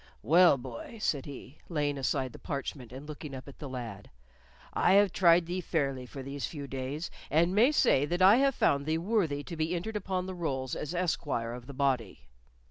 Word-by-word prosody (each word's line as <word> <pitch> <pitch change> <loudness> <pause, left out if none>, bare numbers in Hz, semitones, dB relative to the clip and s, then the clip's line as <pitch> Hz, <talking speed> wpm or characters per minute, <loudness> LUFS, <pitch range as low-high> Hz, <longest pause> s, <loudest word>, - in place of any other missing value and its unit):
"Well, 165 - +6
boy," 125 - -8
said 145 -9 -1
he, 140 +1 -10
laying 145 -4 0
aside 130 -2 -1
the - - -11
parchment 140 -3 -5
and 135 +3 -9
looking 150 -2 -7
up 130 - -9
at 140 - -12
the 145 - -6
lad, 115 -6 -7 0.6
"I - - +3
have 200 -1 +5
tried 170 -2 +5
thee 180 +2 -3
fairly 135 -7 -1
for 135 +1 -8
these 140 +1 -4
few 145 -3 -7
days, 135 +4 -4 0.2
and 170 +5 +3
may 230 +8 +5
say 230 - +3
that 175 +4 -2
I 200 +5 +8
have 275 -1 +3
found 140 +1 +2
thee 160 +1 +1
worthy 170 -6 0
to 170 - -7
be 160 +2 -1
entered 215 +6 -4
upon 185 -2 -2
the 190 - -5
rolls 135 -7 -3
as 150 +4 -4
esquire 145 -9 -1
of 125 0 -9
the 140 - -9
body." 125 - -1
145 Hz, 205 wpm, -30 LUFS, 130-175 Hz, 0.6 s, I